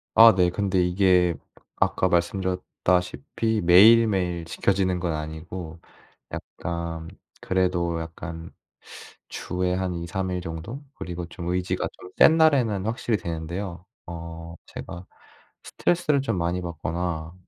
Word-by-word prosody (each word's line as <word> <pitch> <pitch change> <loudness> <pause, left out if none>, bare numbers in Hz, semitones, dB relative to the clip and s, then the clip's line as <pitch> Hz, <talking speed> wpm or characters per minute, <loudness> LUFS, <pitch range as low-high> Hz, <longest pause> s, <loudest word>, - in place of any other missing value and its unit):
아, 115 0 +9
네. 90 -2 +4
근데 95 -1 0
이게 90 -1 +3 0.4
아까 95 - +1
말씀드렸다시피 90 +2 0
매일매일 95 -2 +5
지켜지는 95 +1 0
건 85 -2 -1
아니고 80 +2 -6 0.5
약간 85 -1 -5 0.3
그래도 90 -3 0
약간 80 0 -8 0.8
주에 90 0 -2
한 95 -1 -2
2-3 90 +2 -3
일 90 - -2
정도 85 - -7
그리고 90 0 -5
좀 85 +1 -6
의지가 90 0 -1
좀 90 - -13
센 160 - +8
날에는 125 -11 +3
확실히 115 0 0
되는데요. 85 +1 -5 0.2
어 85 0 -8
제가 85 +2 -8 0.6
스트레스를 155 -5 +1
좀 115 -8 -1
많이 85 +2 -1
받거나 85 0 -4
90 Hz, 250 characters per minute, -25 LUFS, 85-95 Hz, 0.8 s, 아